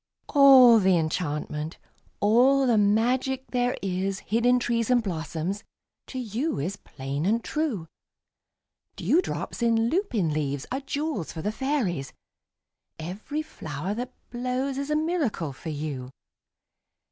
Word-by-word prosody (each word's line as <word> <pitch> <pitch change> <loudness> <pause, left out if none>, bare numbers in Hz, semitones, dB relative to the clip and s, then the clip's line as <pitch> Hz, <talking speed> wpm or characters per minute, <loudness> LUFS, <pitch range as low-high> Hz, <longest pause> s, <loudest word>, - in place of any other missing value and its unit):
All 265 -5 +8
the 190 -3 +4
enchantment, 155 -1 -2 0.4
all 255 +6 +5
the 235 -4 +4
magic 250 +6 +2
there 245 0 +1
is 190 +1 -1
Hid 230 +3 0
in 250 0 +5
trees 235 -2 0
and 245 -2 +4
blossoms, 170 +2 -3 0.4
to 260 - -7
you 250 +6 -2
is 175 +8 -2
plain 140 -4 -5
and 225 +5 +1
true. 290 - -2 1.1
Dewdrops 345 -6 0
in 230 -1 +3
lupin 235 - 0
leaves 145 -2 -2
are 260 - -1
jewels 285 - -3
for 160 - -7
the 210 - 0
fairies; 220 - -1 0.8
Every 205 - -4
flower 155 - -5
that 245 +3 -4 0.2
blows 255 +3 -2
is 280 +1 -4
a 300 - +1
miracle 300 - -1
for 160 +5 -8
you. 145 -4 -4
225 Hz, 130 wpm, -26 LUFS, 165-260 Hz, 1.1 s, All